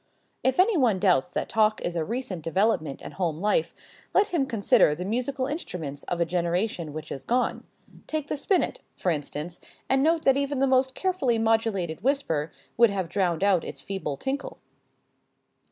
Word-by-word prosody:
If 260 +3 +1
any 400 +3 +5
one 245 - +3
doubts 180 -5 +3
that - - -2
talk 215 -1 +2
is 175 - -3
a 165 - 0
recent 215 -3 -4
development 165 -4 0
in 145 - -7
home 165 -2 -2
life, 170 -4 +1 0.4
let 410 +1 +4
him 310 -8 0
consider 225 - +3
the 180 +3 -5
musical 255 +5 -1
instruments 180 - -5
of 175 - -3
a 170 - +3
generation 175 0 -1
which 155 +1 -7
is 135 - -5
gone. 245 - 0 0.4
Take 310 -2 -2
the - - -2
spinnet, 360 +6 0 0.2
for 180 - 0
instance, 150 +3 -4 0.3
and 265 0 +3
note 320 +2 +2
that 270 0 +4
even 280 0 -1
the 270 - +3
most 260 0 +2
carefully 360 -11 +1
modulated 225 -7 0
whisper 165 - 0 0.3
would 235 0 +6
have 190 -4 -2
drowned 180 -2 0
out 195 -4 +3
its - - -7
feeble 190 -8 -4
tinkle. 275 - -4
205 Hz, 175 wpm, -26 LUFS, 170-265 Hz, 0.4 s, would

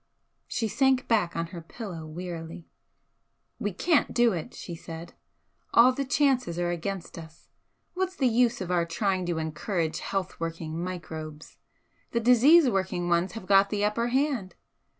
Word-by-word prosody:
She 225 - -1
sank 265 +3 +2
back 210 -7 +1
on 165 - -1
her 170 - -6
pillow 165 -3 -8
wearily. 170 0 -7 0.9
"We 205 -3 -1
can't 310 - +1
do 240 -2 +4
it," 165 -3 -5
she 175 - -7
said 165 0 -9 0.6
"All 240 +2 +8
the 275 +1 -2
chances 260 - +1
are 175 0 0
against 175 0 -5
us. 160 0 -14 0.4
What's 375 0 -2
the 270 - 0
use 240 -1 +2
of 180 -1 -3
our 175 -1 +2
trying 185 +2 -1
to 170 -2 -1
encourage 160 +1 -2
'health 195 -2 -3
working 165 0 -4
microbes'? 160 -4 -7 0.5
The 235 - +2
disease 255 +7 +6
working 185 -5 -1
ones 170 +2 +1
have 225 -4 -7
got 195 +1 +5
the 205 0 0
upper 230 +3 0
hand. 260 -6 0
185 Hz, 155 wpm, -27 LUFS, 170-240 Hz, 0.9 s, All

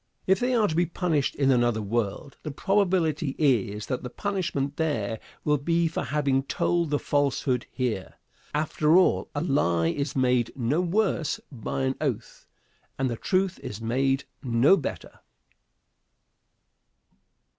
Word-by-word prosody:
If 190 +1 +3
they 250 +1 +1
are 220 -3 +3
to 160 - -2
be 175 +1 +2
punished 165 -5 0
in 135 -1 +3
another 120 -3 +2
world, 115 +5 -2
the 155 - -5
probability 170 -4 +1
is 110 -8 +1
that 130 - -3
the 125 - -6
punishment 170 -7 -2
there 115 -9 -1 0.2
will 150 -1 +2
be 165 +3 +1
for 165 - -3
having 140 -3 +1
told 170 +4 0
the 145 - +2
falsehood 140 -4 0
here. 120 -7 -3 0.4
After 155 +2 +2
all, 185 - +3
a 145 - 0
lie 85 - +2
is 140 - -2
made 125 -3 +2
no 135 +6 +1
worse 180 -3 0
by 135 +2 -3
an 130 0 +1
oath, 135 -8 -4 0.5
and 135 -2 0
the - - -2
truth 185 - 0
is 105 - -7
made 135 +4 0 0.2
no 125 +7 +4
better. 160 - -6
140 Hz, 145 wpm, -26 LUFS, 125-165 Hz, 0.5 s, no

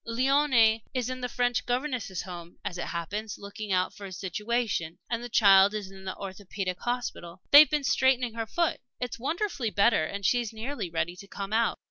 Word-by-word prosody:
"Léonie 240 -2 +3
is 255 0 -1
in 255 0 -5
the 250 - -2
French 245 0 0
Governesses' 245 - -2
Home, 175 -2 -9
as 185 -3 -4
it - - -2
happens, 200 +5 -4
looking 205 +1 -7
out 185 0 +1
for 200 - -8
a - - -10
situation, 200 -2 -2
and 230 0 -1
the 245 - -6
child 200 -2 +6
is 200 -3 -5
in 190 0 -12
the 190 - -4
Orthopædic 190 -1 -5
Hospital. 215 -8 -4
They've 295 +1 +10
been 300 -2 0
straightening 260 -3 +2
her 225 -1 -4
foot. 340 +8 0 0.2
It's 245 -2 -4
wonderfully 315 - -2
better, 205 -3 +3
and 200 +5 -4
she's 240 +1 +2
nearly 225 -2 -5
ready 165 +1 -2
to 200 - -11
come 200 +1 -6
out." 230 +1 +2
220 Hz, 190 wpm, -28 LUFS, 190-245 Hz, 0.2 s, They've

